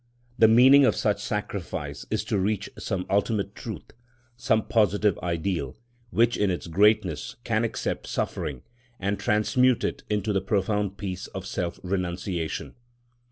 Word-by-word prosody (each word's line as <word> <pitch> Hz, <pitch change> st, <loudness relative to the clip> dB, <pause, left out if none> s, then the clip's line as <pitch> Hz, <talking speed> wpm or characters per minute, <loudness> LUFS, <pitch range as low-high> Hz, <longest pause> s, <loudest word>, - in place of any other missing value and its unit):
The 110 Hz, -, +8 dB
meaning 130 Hz, +5 st, +7 dB
of 130 Hz, -, +4 dB
such 105 Hz, -1 st, 0 dB
sacrifice 105 Hz, -4 st, -4 dB
is -, -, -1 dB
to 100 Hz, -, -1 dB
reach 100 Hz, +1 st, -1 dB
some 95 Hz, -4 st, -3 dB
ultimate 100 Hz, 0 st, 0 dB
truth, 105 Hz, -8 st, -8 dB, 0.4 s
some 115 Hz, -3 st, +1 dB
positive 105 Hz, -3 st, +2 dB
ideal, 85 Hz, -5 st, -2 dB, 0.3 s
which 120 Hz, +1 st, +3 dB
in 105 Hz, -, +2 dB
its 90 Hz, -, -2 dB
greatness 95 Hz, -2 st, +2 dB
can -, -, +1 dB
accept -, -, -3 dB
suffering 65 Hz, -4 st, -3 dB, 0.4 s
and 100 Hz, +1 st, -1 dB
transmute 125 Hz, +4 st, +2 dB
it -, -, -2 dB
into 105 Hz, 0 st, 0 dB
the 95 Hz, -, +1 dB
profound 100 Hz, 0 st, 0 dB
peace 95 Hz, -2 st, -5 dB
of 95 Hz, -2 st, -7 dB
self 90 Hz, -3 st, -3 dB
renunciation. 90 Hz, -2 st, -3 dB
100 Hz, 140 wpm, -26 LUFS, 90-110 Hz, 0.4 s, The